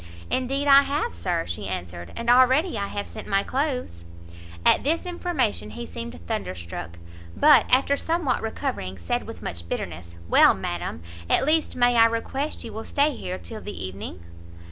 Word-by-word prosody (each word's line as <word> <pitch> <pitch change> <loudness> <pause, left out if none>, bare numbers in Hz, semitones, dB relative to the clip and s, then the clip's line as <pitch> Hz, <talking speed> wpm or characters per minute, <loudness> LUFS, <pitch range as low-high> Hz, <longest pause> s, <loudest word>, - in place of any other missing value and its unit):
"Indeed 270 +3 0
I 275 0 +9
have, 280 - -1
Sir," 85 -1 -2
she 85 +4 -5
answered, 85 -2 -6
"and 235 0 -5
already 260 +6 +5
I 200 -2 -2
have 205 0 -4
sent - - -9
my 195 0 +2
clothes." 255 - -2 0.6
At - - +5
this 325 +5 0
information 345 - -1
he 240 - -7
seemed 235 +1 -7
thunderstruck; 85 - -5 0.4
but, 290 -7 +6
after 270 +2 +4
somewhat 320 -3 0
recovering, 220 - -4
said 85 -1 -2
with - - -9
much 85 0 -5
bitterness, 85 0 -5
"Well, - - +6
madam, 80 - -4 0.3
at - - +3
least 310 +1 +2
may 245 -1 +3
I 230 - +8
request 250 +6 -2
you 225 - -8
will 220 +1 -5
stay 285 0 +1
here 185 -4 -5
till 220 +1 -8
the 205 - -6
evening?" 95 -1 -7
235 Hz, 165 wpm, -25 LUFS, -, 0.6 s, I